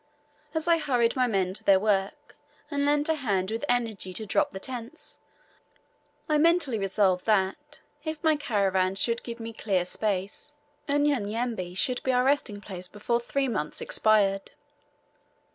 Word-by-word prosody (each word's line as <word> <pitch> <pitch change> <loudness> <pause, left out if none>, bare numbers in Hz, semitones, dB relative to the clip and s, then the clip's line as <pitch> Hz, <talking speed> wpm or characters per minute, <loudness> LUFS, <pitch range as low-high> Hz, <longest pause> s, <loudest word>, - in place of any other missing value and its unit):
As 320 +1 0
I 335 -1 +4
hurried 245 -6 +1
my 255 -1 +2
men 190 -4 0
to - - -4
their 195 -1 +5
work, 195 -1 -1 0.4
and 285 -1 0
lent 290 0 +2
a 320 - +3
hand 205 -10 -1
with 225 +4 -3
energy 225 -6 -1
to 220 - -4
drop 200 - +1
the 190 - -7
tents, 250 +6 -8 1.1
I 305 -2 +2
mentally 315 -7 +3
resolved 195 -1 +1
that, 220 +9 0 0.2
if 315 -1 -5
my 315 -1 +4
caravans 195 -8 0
a - - +4
should 235 -1 0
give 235 -1 -7
me 230 0 -6
clear 195 -5 0
space, 205 +8 -3 0.4
Unyanyembe 235 -9 0
should 250 +5 +1
be 260 - 0
our 250 0 +3
resting 260 -7 0
place 185 -3 -6
before 210 +5 -1
three 270 +3 -1
months 170 -11 -3
expired. 200 -3 +2
225 Hz, 160 wpm, -27 LUFS, 195-280 Hz, 1.1 s, their